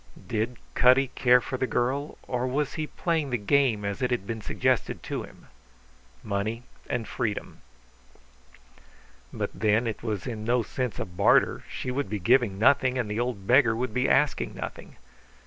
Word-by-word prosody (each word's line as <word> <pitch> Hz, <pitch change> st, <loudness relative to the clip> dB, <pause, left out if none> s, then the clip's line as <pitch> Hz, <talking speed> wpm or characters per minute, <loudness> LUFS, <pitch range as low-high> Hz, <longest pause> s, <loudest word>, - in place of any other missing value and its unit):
Did 115 Hz, +2 st, -2 dB, 0.2 s
Cutty 130 Hz, +1 st, +5 dB
care 125 Hz, -1 st, +4 dB
for 130 Hz, +2 st, -4 dB
the 130 Hz, -, -1 dB
girl, 135 Hz, +5 st, -1 dB
or 125 Hz, 0 st, -1 dB
was 140 Hz, +2 st, -1 dB
he 155 Hz, -1 st, -3 dB
playing 160 Hz, -4 st, -1 dB
the 125 Hz, -, 0 dB
game 115 Hz, -1 st, +2 dB
as 100 Hz, +5 st, -3 dB
it 125 Hz, -, +1 dB
had 120 Hz, -6 st, -1 dB
been 110 Hz, +1 st, -4 dB
suggested -, -, -1 dB
to -, -, -3 dB
him? -, -, -13 dB, 0.8 s
Money 110 Hz, +4 st, -2 dB, 0.3 s
and 115 Hz, -3 st, -2 dB
freedom. 105 Hz, -1 st, -4 dB, 1.7 s
But -, -, -3 dB
then, 110 Hz, +2 st, +2 dB
it 110 Hz, -2 st, -3 dB
was 105 Hz, -6 st, -3 dB
in 110 Hz, -3 st, -5 dB
no 120 Hz, +1 st, +2 dB
sense 125 Hz, +1 st, -3 dB
a -, -, -2 dB
barter; 90 Hz, +2 st, +3 dB
she 125 Hz, -, -4 dB
would 140 Hz, -3 st, -2 dB
be 105 Hz, -, -2 dB
giving 115 Hz, +1 st, +3 dB
nothing, 130 Hz, +3 st, +3 dB
and 115 Hz, -4 st, -2 dB
the 105 Hz, -, -2 dB
old 120 Hz, -5 st, -2 dB
beggar 120 Hz, -1 st, +5 dB
would 120 Hz, -1 st, -3 dB
be 125 Hz, +2 st, +1 dB
asking 135 Hz, -, +2 dB
nothing. -, -, -7 dB
120 Hz, 170 wpm, -27 LUFS, 110-130 Hz, 1.7 s, Cutty